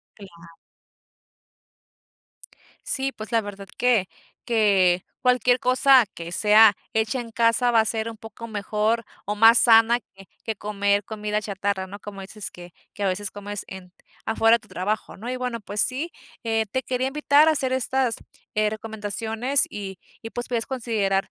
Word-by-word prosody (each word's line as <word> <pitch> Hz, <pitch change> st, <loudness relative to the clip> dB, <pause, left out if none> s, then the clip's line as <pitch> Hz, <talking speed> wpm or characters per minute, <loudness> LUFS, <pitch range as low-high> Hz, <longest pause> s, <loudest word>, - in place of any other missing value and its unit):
Claro. 170 Hz, -5 st, -14 dB, 2.4 s
Sí, 270 Hz, -1 st, -1 dB
pues, 215 Hz, +2 st, -9 dB
la 230 Hz, -, +4 dB
verdad 200 Hz, -2 st, -9 dB
que, 235 Hz, -7 st, +2 dB, 0.4 s
que 195 Hz, -6 st, +3 dB, 0.2 s
cualquier 250 Hz, -1 st, +3 dB
cosa 255 Hz, -1 st, +5 dB
que 170 Hz, +1 st, -8 dB
sea 210 Hz, +2 st, +6 dB, 0.2 s
hecha 220 Hz, +3 st, 0 dB
en 230 Hz, -1 st, -8 dB
casa 230 Hz, +2 st, +2 dB
va 230 Hz, -1 st, +4 dB
a -, -, +2 dB
ser 220 Hz, 0 st, -2 dB
un 225 Hz, -, -10 dB
poco 225 Hz, +1 st, -10 dB
mejor 215 Hz, +2 st, -1 dB, 0.2 s
o 210 Hz, -, -1 dB
más 225 Hz, +2 st, +7 dB
sana 230 Hz, +1 st, +5 dB
que 195 Hz, -2 st, -18 dB, 0.2 s
que 220 Hz, -2 st, -3 dB
comer 205 Hz, 0 st, 0 dB
comida 210 Hz, -1 st, -3 dB
chatarra, 200 Hz, -2 st, -3 dB
¿no?, 200 Hz, +2 st, -10 dB
como 200 Hz, -1 st, -9 dB
dices 205 Hz, +1 st, -7 dB
que 175 Hz, 0 st, -13 dB, 0.2 s
que 205 Hz, -, -7 dB
a -, -, +2 dB
veces 195 Hz, +2 st, -2 dB
comes 205 Hz, 0 st, -6 dB
en 185 Hz, -1 st, -10 dB, 0.3 s
afuera 225 Hz, +1 st, +4 dB
de -, -, -10 dB
tu -, -, -21 dB
trabajo, 210 Hz, +4 st, -3 dB
¿no?, 235 Hz, +5 st, -6 dB
y 255 Hz, -, -3 dB
bueno, 250 Hz, -2 st, -4 dB
pues 205 Hz, +1 st, -3 dB
sí, 290 Hz, +7 st, -2 dB, 0.3 s
eh, 225 Hz, -1 st, 0 dB
te 260 Hz, -, -1 dB
quería 255 Hz, +1 st, -2 dB
invitar 295 Hz, +1 st, +4 dB
a -, -, +5 dB
hacer 260 Hz, -4 st, -1 dB
estas, 260 Hz, -2 st, 0 dB, 0.4 s
eh, 215 Hz, 0 st, +2 dB
recomendaciones 220 Hz, +4 st, -1 dB
y 195 Hz, -3 st, -7 dB, 0.2 s
y, 225 Hz, -, -7 dB
pues, 240 Hz, -, -5 dB
puedes 235 Hz, -2 st, -1 dB
considerar 220 Hz, -7 st, -1 dB
220 Hz, 170 wpm, -24 LUFS, 200-240 Hz, 2.4 s, más